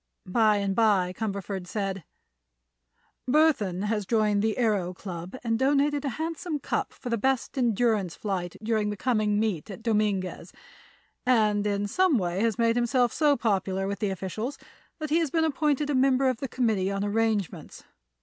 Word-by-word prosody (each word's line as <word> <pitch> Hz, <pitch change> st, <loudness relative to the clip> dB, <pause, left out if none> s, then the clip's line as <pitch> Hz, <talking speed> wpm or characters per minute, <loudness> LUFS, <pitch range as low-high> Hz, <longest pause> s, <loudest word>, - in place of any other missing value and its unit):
By 215 Hz, +2 st, +3 dB
and 200 Hz, -1 st, 0 dB
by 195 Hz, -5 st, +3 dB
Cumberford 200 Hz, -3 st, -4 dB
said: 195 Hz, -2 st, -3 dB, 1.3 s
"Burthon 245 Hz, -, +2 dB
has 210 Hz, -2 st, -1 dB
joined 210 Hz, -2 st, +2 dB
the 220 Hz, 0 st, 0 dB
Aëro 205 Hz, -7 st, 0 dB
Club, 180 Hz, +1 st, -7 dB
has 230 Hz, -1 st, 0 dB
donated 285 Hz, +2 st, +2 dB
a 280 Hz, -, -1 dB
handsome 325 Hz, 0 st, -3 dB
cup -, -, -2 dB
for 255 Hz, -, -8 dB
the 235 Hz, -, 0 dB
best 265 Hz, +2 st, 0 dB
endurance 225 Hz, -7 st, +1 dB
flight 185 Hz, -4 st, -3 dB
during 215 Hz, -1 st, 0 dB
the 205 Hz, -, -4 dB
coming 215 Hz, -3 st, +1 dB
meet 210 Hz, -8 st, -1 dB
at 210 Hz, +3 st, -9 dB
Dominguez, 210 Hz, -5 st, -1 dB, 0.7 s
and 215 Hz, -4 st, +2 dB
in 200 Hz, 0 st, 0 dB
some 345 Hz, -, +2 dB
way 180 Hz, -1 st, -1 dB
has 225 Hz, -3 st, +1 dB
made 230 Hz, 0 st, +2 dB
himself 245 Hz, 0 st, +2 dB
so 295 Hz, -2 st, +3 dB
popular 195 Hz, -4 st, 0 dB
with 200 Hz, +1 st, -3 dB
the 210 Hz, -, 0 dB
officials 195 Hz, +8 st, -4 dB, 0.4 s
that 310 Hz, -2 st, -5 dB
he 325 Hz, -, +4 dB
has 325 Hz, -3 st, 0 dB
been 325 Hz, +2 st, +1 dB
appointed 295 Hz, -1 st, 0 dB
a -, -, 0 dB
member 265 Hz, 0 st, +3 dB
of 255 Hz, -, -1 dB
the 270 Hz, -, -4 dB
committee 220 Hz, -7 st, 0 dB
on 195 Hz, 0 st, -2 dB
arrangements. 210 Hz, -2 st, -1 dB
220 Hz, 170 wpm, -27 LUFS, 200-255 Hz, 1.3 s, he